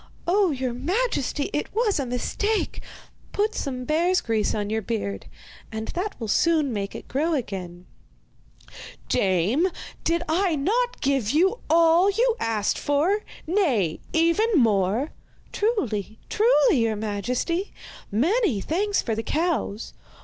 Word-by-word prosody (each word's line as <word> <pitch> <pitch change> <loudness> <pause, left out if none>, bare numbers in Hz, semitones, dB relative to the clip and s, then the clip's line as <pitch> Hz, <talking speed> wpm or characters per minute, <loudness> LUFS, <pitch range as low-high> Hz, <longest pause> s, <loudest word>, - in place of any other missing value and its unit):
'Oh, 380 +2 +3
your 260 -4 -2
majesty, 295 - -1
it 295 - -2
was 435 -7 +2
a 270 - -2
mistake! 410 - -1 0.5
Put 425 +2 +1
some 255 -2 -4
bear's 345 +5 +2
grease 225 -6 0
on 205 -1 -2
your 220 0 0
beard 190 - -4 0.4
and 220 0 -5
that 390 +4 -4
will 225 - -4
soon 305 +3 +2
make 200 -2 -4
it - - -8
grow 310 +5 0
again.' 185 -8 -5 1.2
'Dame, 195 - +2 0.4
did 335 +1 +1
I 340 +2 +1
not 465 - 0
give 270 -6 +1
you 375 - +2
all 335 +3 +5
you 465 +3 +2
asked 215 -3 0
for 320 +9 +1 0.2
nay, 275 - +1
even 335 +7 +3
more?' 220 - +2 0.4
'Truly, 220 - -1
truly, 445 - +4
your 225 -1 +1
majesty. 240 - -2 0.4
Many 310 - +2
thanks 395 - 0
for 230 - -1
the 220 - -1
cows. 310 - -2
295 Hz, 130 wpm, -24 LUFS, -, 1.2 s, all